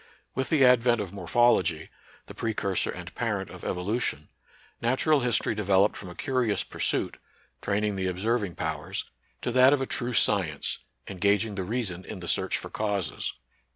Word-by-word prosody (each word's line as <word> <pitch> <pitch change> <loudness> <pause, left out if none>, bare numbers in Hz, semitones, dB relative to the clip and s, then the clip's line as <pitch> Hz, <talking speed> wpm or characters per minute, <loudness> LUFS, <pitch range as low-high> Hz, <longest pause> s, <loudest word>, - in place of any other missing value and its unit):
With 130 - -2
the 145 -5 +5
advent 120 -1 +5
of 100 -3 -4
Morphology, 90 -4 +2 0.3
the - - -10
precursor 100 -4 -1
and - - -7
parent - - -2
of - - -11
Evolution, 90 -5 -2 0.5
Natural 130 +6 +3
History 120 -3 +2
devel 100 -2 +4
oped - - -2
from 95 - -8
a 90 - -10
curious 125 -5 0
pursuit, - - -2 0.4
training 105 0 0
the 95 0 -1
observ 105 +6 0
ing 90 -4 -5
powers, 80 +4 -3 0.4
to 125 - -1
that 130 +3 +6
of 145 - +2
a 135 - -1
true 125 -1 -1
science, 90 -10 +2 0.3
engaging 100 +3 +1
the 100 - -3
reason 95 -3 -2
in 95 - -8
the 90 - -7
search - - +1
for - - -8
causes. 100 -5 -2
105 Hz, 165 wpm, -27 LUFS, 95-120 Hz, 0.5 s, that